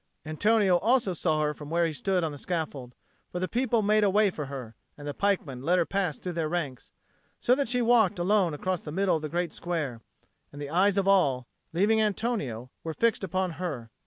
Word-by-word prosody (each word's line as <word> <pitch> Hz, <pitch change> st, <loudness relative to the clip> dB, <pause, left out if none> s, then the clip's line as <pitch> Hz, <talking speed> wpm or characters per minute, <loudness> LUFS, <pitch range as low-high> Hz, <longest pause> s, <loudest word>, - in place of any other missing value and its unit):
Antonio 195 Hz, +4 st, +3 dB
also 225 Hz, 0 st, +2 dB
saw 155 Hz, -2 st, 0 dB
her 150 Hz, 0 st, 0 dB
from 150 Hz, 0 st, -10 dB
where 170 Hz, +1 st, +2 dB
he 165 Hz, -, -1 dB
stood 180 Hz, +6 st, 0 dB
on 160 Hz, -, -1 dB
the 145 Hz, -, -8 dB
scaffold, 145 Hz, -8 st, -4 dB, 0.4 s
for 180 Hz, -, -3 dB
the 185 Hz, -, -1 dB
people 235 Hz, -1 st, +1 dB
made 215 Hz, +1 st, +3 dB
a 205 Hz, -, +4 dB
way 205 Hz, 0 st, +3 dB
for 150 Hz, -5 st, -5 dB
her, 130 Hz, -5 st, -7 dB, 0.2 s
and 145 Hz, 0 st, -8 dB
the 145 Hz, -, -3 dB
pikemen 160 Hz, -9 st, -1 dB
let 175 Hz, +6 st, +2 dB
her 170 Hz, -, +3 dB
pass 190 Hz, -6 st, -1 dB
through 180 Hz, -, -5 dB
their 165 Hz, -2 st, -1 dB
ranks; 150 Hz, -7 st, -4 dB, 0.5 s
so 245 Hz, -, +3 dB
that 275 Hz, -2 st, 0 dB
she 245 Hz, 0 st, +1 dB
walked 225 Hz, -4 st, +4 dB
alone 180 Hz, -2 st, +2 dB
across 185 Hz, +3 st, -2 dB
the 150 Hz, -, -7 dB
middle 190 Hz, +1 st, +2 dB
of -, -, -8 dB
the 155 Hz, -, -4 dB
great 175 Hz, +1 st, -2 dB
square; 155 Hz, -9 st, -3 dB, 0.5 s
and 145 Hz, -, -10 dB
the 145 Hz, 0 st, -5 dB
eyes 195 Hz, +4 st, +3 dB
of 195 Hz, -1 st, +1 dB
all, 140 Hz, -11 st, +3 dB, 0.2 s
leaving 205 Hz, +6 st, +3 dB
Antonio, 195 Hz, -, -2 dB
were 160 Hz, -1 st, -4 dB
fixed 230 Hz, -3 st, +1 dB
upon 185 Hz, 0 st, -1 dB
her. 125 Hz, -11 st, -4 dB
175 Hz, 220 wpm, -28 LUFS, 150-200 Hz, 0.5 s, a